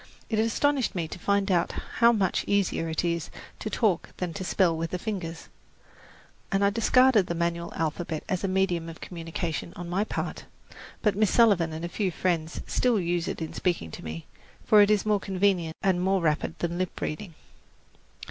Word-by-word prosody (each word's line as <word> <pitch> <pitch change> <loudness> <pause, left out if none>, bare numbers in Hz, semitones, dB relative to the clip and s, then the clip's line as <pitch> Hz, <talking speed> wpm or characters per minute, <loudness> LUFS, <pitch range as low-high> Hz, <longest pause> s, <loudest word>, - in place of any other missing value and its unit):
It 220 - +1
astonished 255 +4 +1
me 170 -3 -1
to 170 - -8
find 200 +1 +1
how 195 +5 +2
much 200 -6 +1
easier 195 -5 +1
it 160 +2 -1
is 170 -1 -1 0.3
to 215 - -4
talk 210 -7 0
than 180 -2 -3
to 190 - -5
spell 175 -1 +2
with 165 +1 -3
the 180 - -2
fingers, 180 -5 -5 1.0
and 195 0 +3
I 200 - +3
discarded 230 -1 +4
the 170 - -2
manual 170 0 -1
alphabet 160 0 -2
as 185 0 -1
a - - +1
medium 185 -3 0
of 165 - -10
communication 165 -1 -4
on 175 - -6
my 190 +4 +1
part; - - -4 0.6
but 210 -3 +3
Miss 210 -1 +3
Sullivan 200 -8 +4
and 160 +2 -4
a - - -2
few 195 +2 -1
friends 170 -2 -1
still 245 -4 +2
use 175 -1 -1
it - - -3
in 160 - -6
speaking 170 - -1
to - - -9
me, 80 0 -6 0.4
for 210 -1 +7
it 205 - +5
is 210 -1 +2
more 210 -1 +2
convenient 185 -4 0
and 185 -2 +2
more 190 +1 +2
rapid 160 +1 0
than 170 +2 -2
lip 185 -1 -3
reading. 165 +2 -4
180 Hz, 185 wpm, -27 LUFS, 165-200 Hz, 1.0 s, for